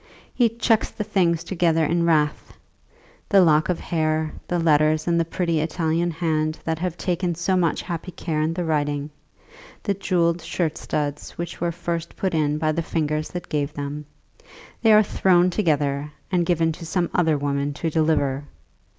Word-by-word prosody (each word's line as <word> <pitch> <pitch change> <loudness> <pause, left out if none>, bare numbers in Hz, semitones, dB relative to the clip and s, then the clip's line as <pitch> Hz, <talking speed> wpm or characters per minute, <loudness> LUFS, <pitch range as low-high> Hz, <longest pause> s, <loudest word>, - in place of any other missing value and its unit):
He 240 -2 +3
chucks 230 -1 +1
the 210 - -4
things 175 -6 +1
together 165 -3 +1
in 170 +1 +1
wrath, 150 -2 0 0.7
the 200 - +6
lock 155 -3 +4
of 180 - 0
hair, 155 -1 -1
the 175 - 0
letters 155 -1 +3
in 170 -1 +2
the - - +3
pretty 165 -1 -1
Italian 165 +2 0
hand 155 -2 -1
that 160 -1 -2
have 175 -1 -3
taken 175 -1 -1
so 175 +3 0
much 170 -3 +1
happy 170 0 -5
care 160 -3 -2
in 160 +2 0
the 175 -1 -2
writing, 145 -1 -1 0.7
the 200 - +1
jewelled 175 -3 +1
shirt 160 -1 -2
studs, 145 -1 -3
which 170 -1 -6
were 170 0 +1
first 170 0 -4
put 190 -2 -2
in 150 -2 +1
by 155 0 +1
the 165 +2 -1
fingers 155 -1 -1
that 175 - -6
gave 150 0 -2
them. 145 +1 -5 0.8
They 225 - +5
are 215 0 +7
thrown 180 -3 +3
together, 150 -6 0 0.2
and 175 -2 +1
given 165 -2 +2
to 165 +2 -8
some 175 0 -1
other 160 -4 +2
woman 140 0 -1
to 165 +2 -2
deliver. 145 -3 +1
165 Hz, 175 wpm, -23 LUFS, 155-175 Hz, 0.8 s, are